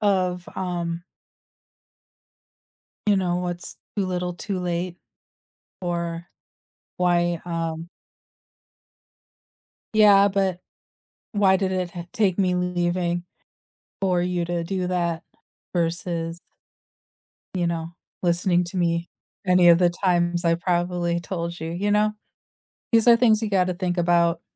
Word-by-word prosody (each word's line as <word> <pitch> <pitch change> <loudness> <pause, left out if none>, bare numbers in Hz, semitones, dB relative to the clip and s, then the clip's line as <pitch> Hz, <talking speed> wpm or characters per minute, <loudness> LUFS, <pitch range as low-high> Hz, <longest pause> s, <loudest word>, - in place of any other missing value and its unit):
of, 185 -3 +1
um 175 -2 -3 2.1
You 205 - +5
know, 180 -2 0
what's 175 0 -4 0.2
too 200 - +1
little 180 -1 -2
too 190 +2 -3
late, 175 0 -2 0.8
or 170 -1 -3 0.7
why 175 -1 +2
um 165 -1 -3 2.1
Yeah, 205 -2 +7
but 190 -2 0 0.7
why 200 -3 +4
did 190 0 -1
it 185 -2 -1
t 175 -1 -7
take 205 -6 +1
me 185 -2 +2
leaving 175 -1 0 0.8
for 180 -2 +2
you 175 -1 -1
to 170 0 -2
do 185 +1 -2
that, 170 -2 -1 0.5
versus 170 -1 -1 1.2
You 175 -2 0
know, 165 0 -3 0.3
listening 175 0 +2
to 175 +2 -7
me, 170 -1 0 0.4
any 180 -1 +6
of 170 -1 +7
the 175 -1 +4
times 175 -1 +1
I 170 - +4
probably 175 0 0
told 170 -1 -4
you. 160 0 -4
You 190 +5 -1
know, 210 +1 +3 0.8
these 225 0 +5
are 235 - +9
things 230 -2 +4
you 215 - -1
gotta 185 -2 +2
think 180 0 -2
about. 170 -1 +2
175 Hz, 120 wpm, -24 LUFS, 170-185 Hz, 2.1 s, are